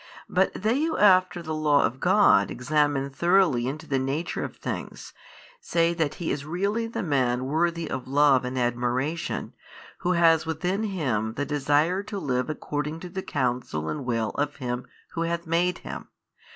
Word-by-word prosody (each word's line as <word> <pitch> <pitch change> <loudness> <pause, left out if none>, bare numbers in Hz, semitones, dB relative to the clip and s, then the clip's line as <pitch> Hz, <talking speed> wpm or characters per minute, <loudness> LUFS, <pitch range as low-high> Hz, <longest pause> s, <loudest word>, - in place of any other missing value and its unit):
But 185 +1 +2
they 225 +8 0
who 325 - -1
after 185 -3 +4
the 160 -1 -4
law 150 -2 +3
of 125 +4 -1
God 180 - +4
examine 140 +1 0
thoroughly 170 -6 +3
into 145 +3 -5
the 135 -2 0
nature 135 +6 -2
of - - -6
things - - -6 0.5
say 170 - +1
that 160 -4 -1
he 170 - -3
is 140 - -2
really 200 +9 -1
the 225 - -4
man 130 -5 +1
worthy 165 +3 0
of 130 -2 -5
love 140 -1 +4
and 125 +1 -4
admiration, 125 +6 -1 0.5
who 180 - +1
has 165 -2 +4
within 180 +5 -2
him 125 - -1
the 145 - -2
desire 150 +5 +1
to 205 0 -6
live 130 -6 -1
according 150 +1 -3
to 180 - -7
the 190 +2 -4
counsel 125 - -2
and 75 - -3
will 115 -3 -1
of 145 0 -2
Him 125 -2 -4 0.2
Who 165 - -4
hath 170 0 -2
made 170 +2 +1
him. - - -7
150 Hz, 170 wpm, -26 LUFS, 130-175 Hz, 0.5 s, after